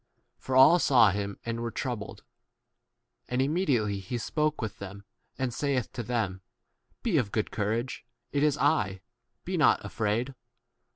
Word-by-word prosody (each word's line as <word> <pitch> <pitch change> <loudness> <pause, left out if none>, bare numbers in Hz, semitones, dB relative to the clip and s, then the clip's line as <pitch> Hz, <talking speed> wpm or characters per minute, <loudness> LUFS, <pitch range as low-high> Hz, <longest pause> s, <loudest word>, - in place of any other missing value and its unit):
For 130 - -3
all 135 +7 +8
saw 120 - +5
him 100 0 -3
and 115 0 -3
were 120 0 -2
troubled. 110 -3 -5 1.1
And 125 - -1
immediately 135 - +1
he 100 +6 -4
spoke 150 +6 -1
with 110 -2 -5
them, 100 +1 -8 0.3
and 130 -2 -2
saith 135 -2 -1
to 120 - -4
them, 110 -5 -2 0.6
Be 195 -11 +2
of 105 -6 -2
good 110 - -1
courage: 115 +4 -2 0.3
it 140 - 0
is 150 -1 +3
I; 95 -14 +1 0.4
be - - -2
not - - +4
afraid. 115 +5 -1
120 Hz, 150 wpm, -28 LUFS, 105-135 Hz, 1.1 s, all